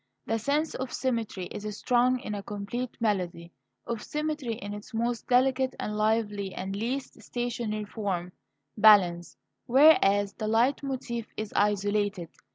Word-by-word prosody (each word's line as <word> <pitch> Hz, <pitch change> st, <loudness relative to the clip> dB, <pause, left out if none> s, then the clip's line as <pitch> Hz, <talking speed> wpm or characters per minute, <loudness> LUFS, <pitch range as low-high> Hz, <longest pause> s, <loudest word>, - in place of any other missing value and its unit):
The 225 Hz, 0 st, 0 dB
sense 290 Hz, +7 st, 0 dB
of 260 Hz, -1 st, -4 dB
symmetry 230 Hz, -7 st, -2 dB
is 210 Hz, 0 st, -5 dB
strong 250 Hz, +1 st, +2 dB
in 210 Hz, -, -5 dB
a 205 Hz, -, -4 dB
complete 205 Hz, +5 st, -5 dB
melody 180 Hz, -6 st, -1 dB, 0.3 s
of 230 Hz, -2 st, -3 dB
symmetry 300 Hz, -5 st, -3 dB
in 205 Hz, -2 st, -7 dB
its 205 Hz, +2 st, -9 dB
most 235 Hz, +1 st, -1 dB
delicate 260 Hz, +1 st, +2 dB
and 210 Hz, -, -3 dB
lively 210 Hz, -2 st, 0 dB
and 190 Hz, +1 st, -4 dB
least 250 Hz, +6 st, -4 dB
stationary 235 Hz, -3 st, -3 dB
form 190 Hz, -5 st, -3 dB, 0.4 s
balance; 190 Hz, -5 st, +5 dB, 0.3 s
whereas 205 Hz, -8 st, +5 dB
the 215 Hz, -, -4 dB
leit 230 Hz, +5 st, +2 dB
motif 250 Hz, -4 st, -4 dB
is 215 Hz, -1 st, -4 dB
isolated. 205 Hz, -3 st, +1 dB
215 Hz, 140 wpm, -28 LUFS, 205-245 Hz, 0.4 s, balance